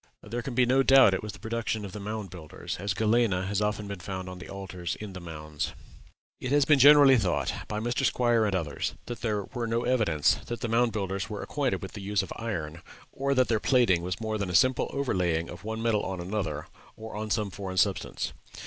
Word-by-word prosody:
There 120 +3 -4
can 120 0 -6
be 125 0 +4
no 130 +2 +4
doubt 135 -6 +7
it 95 - -1
was 105 -2 -6
the - - -10
production 110 -2 -2
of 100 - -7
the 105 - -7
Mound 105 -2 -5
Builders, 80 -5 -7
as 100 0 -2
galena 110 -3 +2
has 100 +1 -1
often 105 0 -1
been 100 -2 -6
found 95 0 -5
on 90 0 -8
the - - -10
altars 95 -3 -5
in 105 -2 -8
the 95 - -7
mounds. 75 -3 -5 0.7
It 130 - -4
has 145 -1 +4
been 145 -1 +5
generally 140 -1 +8
thought, 90 -5 0
by 105 - -3
Mr. 120 +3 -1
Squier 120 -3 +3
and 100 - 0
others, 80 -5 -2
that 120 - -6
there 105 -3 -1
were 120 -3 -2
no 115 +1 0
evidences 105 - +2
that 120 - -5
the - - -1
Mound 115 +1 +2
Builders 100 -1 -3
were 105 -2 -5
acquainted 140 -7 -1
with 95 - -6
the 105 - -8
use 100 0 0
of - - -6
iron, 85 -8 -4 0.3
or 140 +1 -1
that 130 -1 +4
their 110 -2 +1
plating 115 -9 +3
was 90 0 -3
more 110 -1 -2
than 100 -2 -2
a 90 - -2
simple 130 +5 +3
overlaying 90 -12 0
of - - -10
one 110 +1 -4
metal 110 -3 +2
on 95 -1 -4
another, 90 -5 -3 0.3
or 110 0 -8
on 110 0 -4
some 105 -2 0
foreign 95 -1 -6
substance. 95 +1 0
105 Hz, 230 wpm, -28 LUFS, 95-120 Hz, 0.7 s, generally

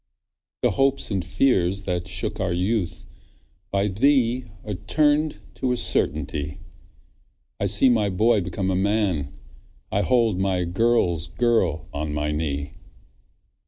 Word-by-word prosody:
The - - +3
hopes 135 -3 +1
and 95 -3 -1
fears 95 -2 +1
that 90 -2 -3
shook - - 0
our 95 -2 -1
youth, 95 +1 -2 0.6
By 100 +1 0
thee 125 +3 +2 0.2
are 105 - -4
turn'd 150 - +1 0.2
to 130 - -1
a 125 - 0
certainty; 75 - 0 1.0
I 100 - 0
see 100 +6 +6
my 110 -5 +2
boy 110 +3 +2
become 95 +1 -2
a - - 0
man, 95 -7 0 0.6
I 100 - +1
hold 115 -5 +1
my 95 -2 0
girl's 90 -3 +1
girl 95 -5 0
on 75 +1 -4
my 75 0 -1
knee. 75 -2 -3
95 Hz, 130 wpm, -23 LUFS, 85-115 Hz, 1.0 s, see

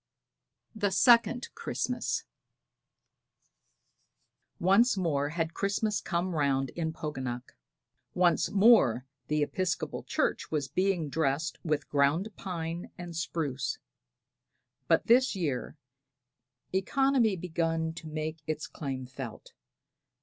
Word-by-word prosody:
THE 210 -3 0
SECOND 235 +6 +4
CHRISTMAS. - - -2 2.4
Once 200 +6 +4
more 145 -6 0
had 165 +1 -2
Christmas 205 0 0
come 175 +1 -1
round 135 -4 +1
in 160 -2 -2
Poganuc; 130 -6 -5 0.6
once 180 -1 +3
more 195 - +5 0.2
the 150 0 +1
Episcopal 185 +4 -2
church - - -1
was 150 -4 -1
being 180 +2 0
dressed 145 +2 -1
with 150 -3 -1
ground 145 +8 +2
pine 170 -2 -5
and 175 -1 -7
spruce; 145 -6 -2 1.1
but 165 - +3
this 250 0 +4
year 155 -5 -2 1.0
economy 260 +5 +3
had 175 - -9
begun 165 -2 -1
to 165 - -9
make 155 0 -4
its 155 -1 -2
claims 130 -3 -6
felt. 130 -5 -8
165 Hz, 105 wpm, -30 LUFS, 145-190 Hz, 2.4 s, more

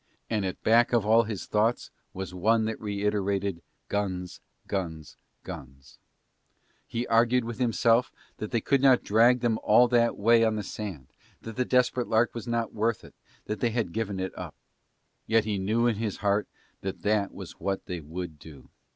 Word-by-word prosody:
And 105 -3 0
at 95 - -5
back 115 +2 +4
of 115 -4 +3
all 115 +2 +5
his 105 -3 -5
thoughts 110 +3 0 0.2
was 95 -1 -6
one 110 +5 +2
that 110 0 -4
reiterated 100 -3 -1 0.3
guns, 95 -3 -3 0.2
guns, 80 -8 -4 0.3
guns. 70 +2 -11 0.9
He 120 +1 -3
argued 120 +2 +3
with 120 +1 -6
himself 120 0 +2 0.3
that 110 - -5
they 115 - 0
could 140 +3 +2
not 130 -2 +5
drag 120 +4 +4
them 115 -2 +1
all 120 +4 +5
that 120 -1 +2
way 115 +2 +4
on 110 -1 +2
the 105 - -3
sand, 95 - -6 0.4
that 115 -1 -7
the 125 - 0
Desperate 125 -1 +2
Lark 115 +1 +2
was 120 0 -7
not 115 -1 -1
worth 110 +1 0
it, - - -14 0.3
that 105 - -4
they 120 - +1
had 110 -7 -2
given 105 -4 -2
it 95 0 -4
up. - - -7 0.7
Yet 110 -1 +3
he 105 -2 -1
knew 110 +5 +1
in 115 -3 +2
his 110 -2 -3
heart 100 0 +1 0.3
that 95 -1 -5
that 105 -1 +1
was - - -10
what 95 -1 -2
they 90 -3 -4
would 80 0 -7
do. 70 -4 -14
110 Hz, 180 wpm, -27 LUFS, 95-115 Hz, 0.9 s, all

